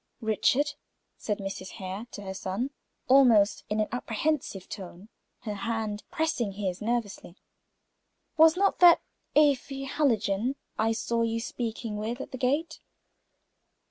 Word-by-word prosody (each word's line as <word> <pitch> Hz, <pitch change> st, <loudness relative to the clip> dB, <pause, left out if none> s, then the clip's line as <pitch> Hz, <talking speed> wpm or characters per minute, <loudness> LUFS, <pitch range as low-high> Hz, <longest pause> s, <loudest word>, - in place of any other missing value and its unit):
"Richard," 255 Hz, +6 st, +2 dB, 0.4 s
said 210 Hz, -2 st, -3 dB
Mrs. 195 Hz, -1 st, -6 dB
Hare 190 Hz, +4 st, -6 dB
to 205 Hz, -, -9 dB
her 190 Hz, -1 st, -5 dB
son, 195 Hz, +8 st, -3 dB, 0.4 s
almost 240 Hz, -6 st, +5 dB
in 210 Hz, +1 st, 0 dB
an 215 Hz, -, +1 dB
apprehensive 245 Hz, -, -2 dB
tone, 190 Hz, +1 st, -9 dB, 0.3 s
her 215 Hz, -, -4 dB
hand 215 Hz, 0 st, -3 dB
pressing 250 Hz, -10 st, -1 dB
his 190 Hz, -2 st, -3 dB
nervously, 215 Hz, -6 st, -3 dB, 1.0 s
"was 320 Hz, +1 st, +6 dB
not 395 Hz, +1 st, +2 dB
that 350 Hz, -2 st, +7 dB, 0.3 s
Afy 275 Hz, -2 st, +3 dB
Hallijohn 235 Hz, -4 st, +1 dB, 0.2 s
I 225 Hz, +1 st, +1 dB
saw 230 Hz, +1 st, -1 dB
you 230 Hz, 0 st, 0 dB
speaking 230 Hz, -2 st, -4 dB
with 225 Hz, +4 st, -3 dB
at -, -, -7 dB
the 260 Hz, -, -6 dB
gate?" 300 Hz, +6 st, 0 dB
225 Hz, 130 wpm, -28 LUFS, 205-270 Hz, 1.0 s, that